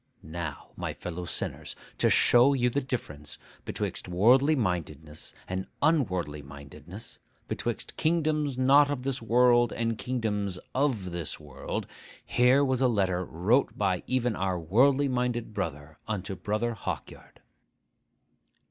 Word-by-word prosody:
Now, 80 -2 -6
my - - -4
fellow 90 0 -6
sinners, - - -4 0.2
to - - +4
show 125 +4 +5
you 125 -1 +2
the 140 - 0
difference 75 - -5 0.3
betwixt - - -3
worldly 125 - +4
mindedness 80 - -3
and 95 +1 -3
unworldly 95 - +1
mindedness, 70 0 -10 0.3
betwixt - - -4
kingdoms 155 -4 +1
not 140 +3 +5
of 140 -3 -3
this 135 -1 -2
world 120 +1 +4
and 115 -1 -2
kingdoms 105 -7 -2 0.2
of 125 -10 0
this 85 -4 -4
world, 75 -4 -5 0.4
here 130 +3 +4
was 130 -1 0
a 130 - +5
letter 95 -6 +1
wrote 100 - +1
by 95 -3 +1
even 125 -3 +1
our 95 -1 -1
worldly 130 - +3
minded 125 -3 -1
brother 75 -4 -5
unto 100 -3 -3
Brother 105 +6 -1
Hawkyard. 110 - -7
115 Hz, 130 wpm, -28 LUFS, 90-130 Hz, 0.4 s, show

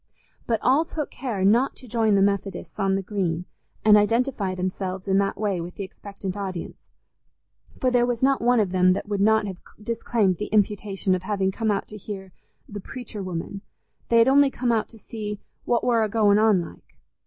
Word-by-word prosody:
But 225 -2 +1
all 270 +6 +4
took 310 -2 -5
care 220 -8 -2
not 235 +7 +3
to 255 - -12
join 220 -2 +2
the 195 - +4
Methodists 200 +1 -2
on 195 -1 +2
the 195 - -2
Green, 180 -4 -2 0.4
and 210 -1 +8
identify 210 -2 +1
themselves 185 +1 -4
in 195 0 +3
that 200 0 0
way 200 -4 -1
with 175 +1 -8
the 200 - -5
expectant 195 0 -7
audience, 190 -4 -5 1.0
for 255 - +2
there 245 -1 +3
was 245 0 -2
not 270 0 +3
one 245 0 +3
of 200 -4 +1
them 185 0 +4
that 195 - -4
would 205 -1 -1
not 220 +1 +4
have 190 -3 -6 0.2
disclaimed 215 -3 0
the 210 - -4
imputation 205 -2 0
of 185 - 0
having 190 0 0
come 220 +3 -2
out 200 -2 0
to 210 - -8
hear 195 -2 -8 0.4
the 205 - -7
"preacher 230 0 -8
woman"—they 195 +5 -5
had 230 +1 +6
only 280 +1 +5
come 250 -2 -1
out 225 -2 0
to 230 - -15
see 210 -1 -6 0.3
"what 240 -1 +1
war 235 -2 +3
a 215 - -1
goin' 210 -1 +4
on, 215 -3 +4
like." 170 - -12
205 Hz, 200 wpm, -24 LUFS, 190-230 Hz, 1.0 s, and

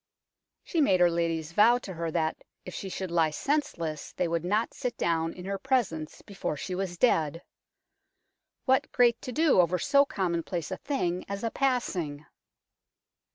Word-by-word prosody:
She 335 - 0
made 190 -10 +4
her 175 -1 +5
ladies 165 -2 -1
vow 220 +7 +5
to 205 -6 -7
her 165 -1 -3
that, 160 -1 -1 0.2
if 180 - -7
she 195 - -5
should 185 -1 -4
lie 165 -2 +3
senseless, 165 - -2
they 180 - 0
would 170 -1 -1
not 210 +6 0
sit 245 -2 -4
down 165 -1 0
in 180 - -10
her 195 0 -3
presence 205 - -1
before 195 -6 -4
she 180 - -5
was 180 -1 -3
dead. 165 - +2 1.2
What 265 0 +2
great 240 -2 +3
to 255 - -6
do 300 - +4
over 180 +1 +1
so 280 - +4
commonplace 175 - -2
a 185 - -3
thing 180 -11 -2
as 200 +1 -4
a 230 - -1
passing 180 - -1
180 Hz, 165 wpm, -28 LUFS, 165-235 Hz, 1.2 s, her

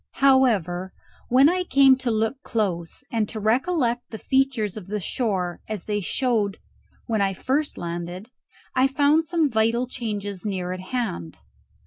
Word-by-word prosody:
However, 210 - +2 0.4
when 260 +3 +6
I 365 +3 +1
came 275 -5 +6
to 255 -2 -2
look 225 +4 0
close, 195 - -2
and 225 -4 0
to 220 - -5
recollect 245 - +1
the 220 - -6
features 260 -6 0
of 205 -4 -8
the 210 +1 -2
shore 185 -3 -2
as 210 -5 -4
they 205 -1 -1
showed 205 - 0 0.5
when 220 -3 0
I 195 -1 +1
first 280 - -1
landed, 175 +6 -5 0.4
I 255 +1 +4
found 290 +4 +2
some 330 -2 +2
vital 230 0 +1
changes 205 -6 -5
near 185 -4 -2
at 185 - -6
hand. 185 - -4
225 Hz, 150 wpm, -24 LUFS, 195-260 Hz, 0.5 s, when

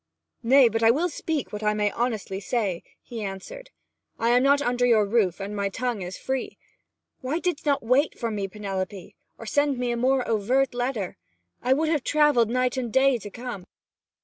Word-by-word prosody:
'Nay, 260 +2 +6
but 225 0 -1
I 225 - +5
will 315 +10 +2
speak 310 -5 -3
what 210 - -4
I 210 0 +1
may 210 -1 +1
honestly 220 -5 -2
say,' 200 -4 -2 0.2
he 230 -3 -6
answered. 200 - -7 0.5
'I 230 - +1
am 245 +1 +4
not 280 +2 +4
under 245 -3 0
your 225 -4 +4
roof, 200 -4 +1
and 200 +1 -5
my 200 -1 -1
tongue 235 0 -3
is 180 +1 -6
free. 265 -1 -4 0.6
Why 265 +5 -2
didst 345 -3 -2
not 280 -4 +2
wait 260 +6 +2
for 230 -1 -2
me, 200 -2 -2
Penelope, 195 -2 -5 0.2
or 230 - -10
send 285 +4 +1
to - - -8
me 245 -1 0
a 235 - -1
more 255 +1 +1
overt 245 +5 +1
letter? 245 -6 -3 0.4
I 255 +2 +3
would 310 +3 0
have 300 -5 0
travelled 295 -7 +3
night 255 +1 0
and 245 -3 -2
day 265 0 +3
to 205 - -8
come!' 235 -4 -7
240 Hz, 200 wpm, -25 LUFS, 210-265 Hz, 0.6 s, Nay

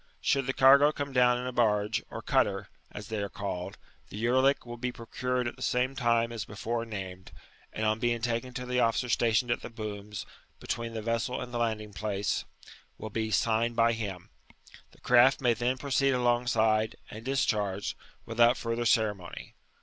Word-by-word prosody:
Should 135 -3 +1
the 130 - 0
cargo 140 +3 +7
come 140 -2 -5
down 125 -1 +4
in 125 - -4
a 125 - -2
barge, 110 -1 +1
or - - -7
cutter - - +1 0.2
(as 105 -1 -8
they 110 -2 -2
are 100 - -3
called), 95 -1 -5 0.3
the - - -8
yeriick 130 +5 +2
will 120 0 -7
be 125 +1 -2
procured 125 +1 -3
at - - -6
tJie - - -14
same 125 +2 0
place 115 -2 +2
as 115 -3 -4
before 115 +3 -3
named, 95 -4 -7 0.4
and 110 - -3
on 110 +1 +1
being 120 0 +1
taken 120 +2 -2
to 125 -1 -4
the 125 0 0
officer 120 +1 +1
stationed 120 +1 +2
at 120 - 0
the - - -7
booms, 105 -2 -6 0.3
between 115 0 -4
the 110 - -4
vessel 115 +2 -1
and 125 -1 -7
the 120 - -1
landing 110 -3 -2
place, 100 -1 -2 0.5
will 110 - -7
be 110 +1 -2
signed 115 +3 +1
by 115 0 +4
him; 100 -6 -6 0.6
the - - -23
craft 125 +2 +5
may 125 -3 +3
then 120 +3 -1
proceed 135 0 +1
alongside, 120 -3 +2 0.2
and 110 +1 -8
discharge, 105 -7 0 0.3
without 115 +1 +4
furthtf 115 0 -2
ceremony. 105 -6 -1
115 Hz, 180 wpm, -29 LUFS, 110-125 Hz, 0.6 s, cargo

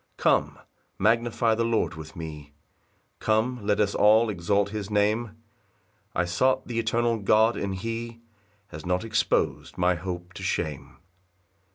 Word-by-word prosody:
2 - - -11
Come, - - +2 0.4
magnify 115 +2 +2
the 115 +1 0
Lord 115 -1 0
with 80 +4 -10
me, 75 -3 -8 0.7
Come, 110 +2 0
let 105 0 +1
us 100 -1 +2
all 110 +2 +5
exalt 100 +2 0
his 105 -1 -5
name; 105 +2 0 0.8
I 90 - +1
sought 130 +10 +1
th' - - -7
eternal 115 0 0
God, 110 +3 +4
and 95 -1 -3
he 115 +3 -5 0.5
Has 75 -3 -9
not 90 +2 0
expos'd 110 -5 0
my 90 0 +3
hope 90 0 -6
to - - -9
shame. 80 -6 -3
105 Hz, 145 wpm, -26 LUFS, 90-115 Hz, 0.8 s, all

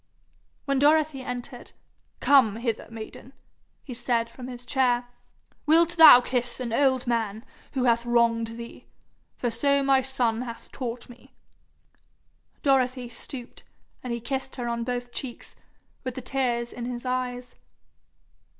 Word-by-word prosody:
When 275 -1 +1
Dorothy 300 -1 +3
entered, 250 0 -7 0.5
'Come 260 -7 +5
hither, 230 -1 -3
maiden,' 225 +3 -10 0.5
he 260 - -8
said 235 -1 -1
from 250 0 -9
his 245 -1 -9
chair. 245 -2 +1 0.6
'Wilt 330 +2 +5
thou 320 -7 +9
kiss 245 -1 -2
an 240 -3 -4
old 260 -1 +2
man 225 -2 -2 0.3
who 260 -3 0
hath 235 -1 +3
wronged 230 -1 +1
thee 235 0 -10 0.5
for 240 - -1
so 280 +4 +2
my 270 -1 +4
son 245 -3 0
hath 235 -2 -8
taught 245 -2 -5
me?' 245 0 -17 1.3
Dorothy 255 -3 +1
stooped, 240 +1 -8 0.4
and 250 - -5
he 235 - -2
kissed 265 +2 -4
her 245 -2 -4
on 235 0 -2
both 245 0 -4
cheeks, 250 -3 -6 0.5
with 255 -2 -4
the 260 - -5
tears 240 -2 -1
in 240 - -6
his 245 0 -5
eyes. 250 -1 -3
245 Hz, 140 wpm, -26 LUFS, 235-265 Hz, 1.3 s, thou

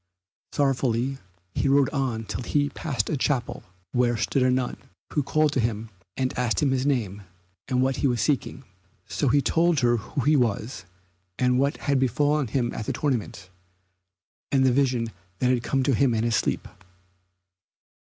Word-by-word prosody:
Sorrowfully 135 -1 0 0.3
he - - 0
rode 140 0 +4
on 130 -6 -1
till - - -4
he 145 +4 0
passed 140 -6 -2
a - - -1
chapel, 130 -2 -1 0.3
where 120 -1 +2
stood 115 +5 0
a 130 - +4
nun, 125 -1 0 0.4
who 150 - +2
called 155 +2 +1
to 135 - +1
him 110 -1 -2 0.3
and 130 -1 -1
asked 125 -2 +1
him 145 -4 +2
his 135 +1 0
name 105 -8 -1 0.5
and 125 0 +1
what 130 0 0
he 140 - +2
was 120 -2 0
seeking. 135 -2 -1 0.4
So - - -1
he 145 -1 +3
told 165 -3 +2
her 120 -1 +3
who 115 +6 -4
he 150 +5 +3
was, 115 -4 -1 0.5
and 125 0 +2
what 140 +1 +1
had 140 -1 0
befallen 145 +3 +1
him 120 +1 -1
at 110 - -5
the - - 0
tournament, 120 - -2 1.0
and 135 -1 +3
the 130 - +5
vision 125 -4 +1 0.3
that 125 0 +2
had 125 -2 +1
come 135 +2 0
to 135 - +2
him 125 0 +3
in 110 - 0
his 115 -1 +1
sleep. - - -1
130 Hz, 175 wpm, -25 LUFS, 120-140 Hz, 1.0 s, the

